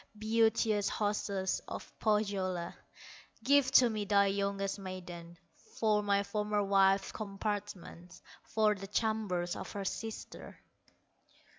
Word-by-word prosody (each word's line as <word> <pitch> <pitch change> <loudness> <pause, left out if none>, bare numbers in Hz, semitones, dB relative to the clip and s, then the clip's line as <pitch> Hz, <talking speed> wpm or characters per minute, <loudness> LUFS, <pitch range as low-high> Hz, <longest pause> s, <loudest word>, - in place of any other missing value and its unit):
Beauteous 220 -1 +2
hostess 200 -2 -1
of - - -7
Pohyola, 195 -5 0 0.7
Give 280 0 +4
to 250 - +8
me 215 -2 -2
thy 200 0 +4
youngest 200 0 -1
maiden, 180 -3 -8 0.4
For 215 -2 +2
my 200 -1 +2
former 210 0 -1
wife's 195 0 +3
compartments, 195 -4 -5 0.2
For 215 -1 +2
the 195 -1 -8
chambers 205 -5 -1
of - - -7
her 200 -1 -4
sister." 225 +3 -6
200 Hz, 110 wpm, -32 LUFS, 195-215 Hz, 0.7 s, to